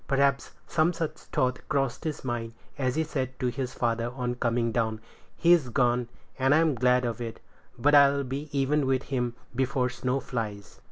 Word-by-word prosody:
Perhaps 140 0 +1
some 170 +2 +2
such 165 -2 -2
thought 130 -4 -1
crossed 135 -3 -1
his 155 -2 -3
mind, 120 -2 -3 0.2
as 130 -2 -1
he 160 - +2
said 130 -4 -4
to 125 -2 +1
his 125 +1 -4
father 115 0 0
on 125 -2 -2
coming 120 -1 0
down, 110 -2 0 0.4
"He's 170 -6 +4
gone, 120 -1 +2 0.3
and 135 +2 +4
I'm 160 -1 +4
glad 125 0 +3
of 120 0 -3
it; 115 -1 -5 0.4
but 145 +5 +3
I'll 140 -1 +6
be 140 +4 -5
even 140 0 +1
with 130 0 +1
him 125 -3 -2 0.2
before 130 0 +1
snow 125 +2 -1
flies." 110 -6 -5
130 Hz, 175 wpm, -27 LUFS, 120-140 Hz, 0.4 s, I'll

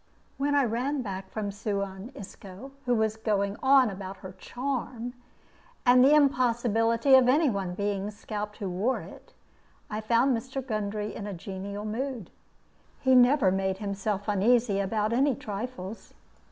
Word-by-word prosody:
When 285 +1 +1
I 285 - +4
ran 255 +4 -1
back 195 -3 -6
from 210 -2 -3
Suan 200 +1 -4
Isco, 200 +5 -10 0.2
who 245 - +3
was 220 -1 0
going 200 -2 0
on 265 -4 +5
about 190 0 -7
her 185 - -6
charm, 245 -1 -4 0.7
and 250 0 +7
the 285 +3 +6
impossibility 240 -3 +3
of 260 -1 +7
any 290 +1 +4
one 190 -3 -3
being 200 0 -2
scalped 210 0 -6
who 200 - -4
wore 195 +8 -1
it, - - -13 0.6
I 210 +1 -3
found 235 +4 +3
Mr. 260 +3 -5
Gundry 210 -2 -3
in 205 - -6
a 200 - -5
genial 200 +3 -6
mood. 235 -2 -4 0.7
He 260 -1 +3
never 250 -4 +5
made 190 0 0
himself 200 0 -3
uneasy 210 +1 +2
about 210 +2 0
any 270 +2 +3
trifles. 210 -1 -7
220 Hz, 150 wpm, -28 LUFS, 200-250 Hz, 0.7 s, and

